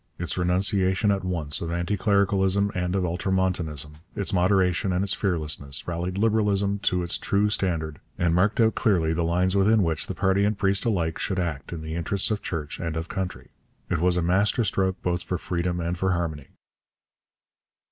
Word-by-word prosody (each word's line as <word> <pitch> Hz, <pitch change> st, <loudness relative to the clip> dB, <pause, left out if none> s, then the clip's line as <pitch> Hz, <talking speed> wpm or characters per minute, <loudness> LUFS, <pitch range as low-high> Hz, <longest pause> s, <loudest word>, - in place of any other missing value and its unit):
Its 85 Hz, -, -2 dB
renunciation 95 Hz, +3 st, +2 dB
at 100 Hz, -1 st, -1 dB
once 80 Hz, -6 st, -1 dB
of 85 Hz, -, -3 dB
anti 85 Hz, +4 st, -1 dB
clericalism 100 Hz, 0 st, +2 dB
and 90 Hz, 0 st, -1 dB
of 95 Hz, -2 st, +1 dB
ultramontanism, 85 Hz, -5 st, -1 dB, 0.2 s
its 100 Hz, -, -1 dB
moderation 95 Hz, 0 st, +2 dB
and 90 Hz, +1 st, +1 dB
its 100 Hz, -, +3 dB
fearlessness, 75 Hz, -7 st, -2 dB
rallied 90 Hz, +2 st, -3 dB
Liberalism 100 Hz, -2 st, +1 dB
to 90 Hz, -2 st, +1 dB
its 85 Hz, -, -2 dB
true 105 Hz, +1 st, +1 dB
standard 80 Hz, -7 st, -1 dB, 0.2 s
and 85 Hz, -1 st, +1 dB
marked 95 Hz, +7 st, +2 dB
out 115 Hz, -1 st, +4 dB
clearly 85 Hz, -8 st, +2 dB
the 85 Hz, -, -1 dB
lines 90 Hz, +3 st, +1 dB
within 105 Hz, +2 st, +4 dB
which 80 Hz, -3 st, -1 dB
party 95 Hz, +1 st, +2 dB
and 105 Hz, 0 st, +1 dB
priest 100 Hz, +1 st, +1 dB
alike 85 Hz, -8 st, 0 dB
should 95 Hz, -, -2 dB
act 85 Hz, -6 st, -3 dB
in 80 Hz, -2 st, -6 dB
the 80 Hz, 0 st, -5 dB
interests 90 Hz, +5 st, -1 dB
of 105 Hz, -, -1 dB
church 75 Hz, -3 st, -4 dB
and 85 Hz, -1 st, -3 dB
of 80 Hz, +1 st, -4 dB
country. 95 Hz, -1 st, -5 dB, 0.4 s
It 85 Hz, -, +1 dB
was 90 Hz, +1 st, +2 dB
a 90 Hz, -, +1 dB
master 100 Hz, +7 st, +2 dB
stroke 95 Hz, -2 st, 0 dB
both 90 Hz, 0 st, 0 dB
for 90 Hz, -, -3 dB
freedom 90 Hz, 0 st, -2 dB
and 85 Hz, +1 st, -2 dB
for 95 Hz, +1 st, 0 dB
harmony. 80 Hz, -5 st, -3 dB
90 Hz, 180 wpm, -25 LUFS, 85-100 Hz, 0.4 s, out